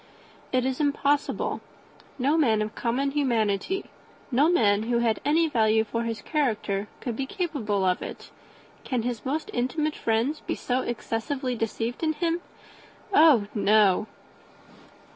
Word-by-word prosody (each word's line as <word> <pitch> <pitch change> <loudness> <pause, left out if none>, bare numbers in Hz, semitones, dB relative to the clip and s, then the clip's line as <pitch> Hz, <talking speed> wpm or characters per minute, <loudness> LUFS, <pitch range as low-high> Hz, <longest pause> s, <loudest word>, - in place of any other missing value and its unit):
It 255 -1 +1
is 260 -1 -1
impossible. 285 -1 0 0.6
No 280 +4 +2
man 225 -9 +3
of 215 0 -5
common 260 +4 -1
humanity, 240 - 0 0.5
no 280 +6 +4
man 210 -11 +3
who 240 - +2
had 235 -2 +1
any 320 +4 +3
value 220 -5 +3
for 230 +1 -3
his 225 -2 -4
character, 215 -9 -1
could 240 -3 -3
be 265 +3 -3
capable 265 - -1
of 180 -1 +1
it. - - -8 0.5
Can 250 -4 -1
his 240 -2 -3
most 310 +10 -3
intimate 300 +4 -1
friends 235 +7 0
be - - -4
so 250 +1 -1
excessively 250 +3 -3
deceived 225 +1 -3
in 315 -1 +1
him? 335 +2 -1 0.7
Oh 300 - +6
no." 210 -1 +3
245 Hz, 140 wpm, -26 LUFS, 220-290 Hz, 0.7 s, Oh